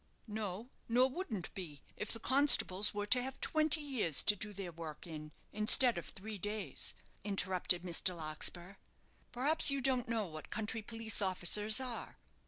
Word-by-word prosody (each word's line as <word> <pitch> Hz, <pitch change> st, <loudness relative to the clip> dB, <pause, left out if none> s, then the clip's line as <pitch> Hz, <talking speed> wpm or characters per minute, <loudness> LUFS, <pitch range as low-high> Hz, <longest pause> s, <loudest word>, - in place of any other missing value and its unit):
"No; 215 Hz, +1 st, -6 dB, 0.2 s
nor 250 Hz, +3 st, +3 dB
wouldn't 260 Hz, -, -6 dB
be, 160 Hz, -8 st, -9 dB
if 210 Hz, -, -3 dB
the 230 Hz, -, -5 dB
constables 245 Hz, -7 st, +3 dB
were 205 Hz, 0 st, -4 dB
to 250 Hz, +4 st, +2 dB
have 265 Hz, +1 st, -6 dB
twenty 310 Hz, 0 st, +1 dB
years 250 Hz, -, 0 dB
to 210 Hz, -, +4 dB
do 210 Hz, +1 st, -6 dB
their 195 Hz, -3 st, -7 dB
work 160 Hz, -1 st, -9 dB
in, 155 Hz, -2 st, -9 dB, 0.2 s
instead 220 Hz, +4 st, +6 dB
of 175 Hz, -, -7 dB
three 210 Hz, +1 st, -9 dB
days," 205 Hz, -7 st, -3 dB, 0.3 s
interrupted 185 Hz, -3 st, 0 dB
Mr. 180 Hz, 0 st, 0 dB
Larkspur. 170 Hz, +4 st, -3 dB, 0.5 s
"Perhaps 295 Hz, +6 st, +5 dB
you 275 Hz, 0 st, -1 dB
don't 255 Hz, -2 st, -1 dB
know 225 Hz, -2 st, -2 dB
what 155 Hz, -3 st, -10 dB
country 220 Hz, +1 st, -4 dB
police 225 Hz, 0 st, 0 dB
officers 205 Hz, +3 st, +3 dB
are? 255 Hz, -3 st, -5 dB
210 Hz, 160 wpm, -34 LUFS, 180-245 Hz, 0.5 s, instead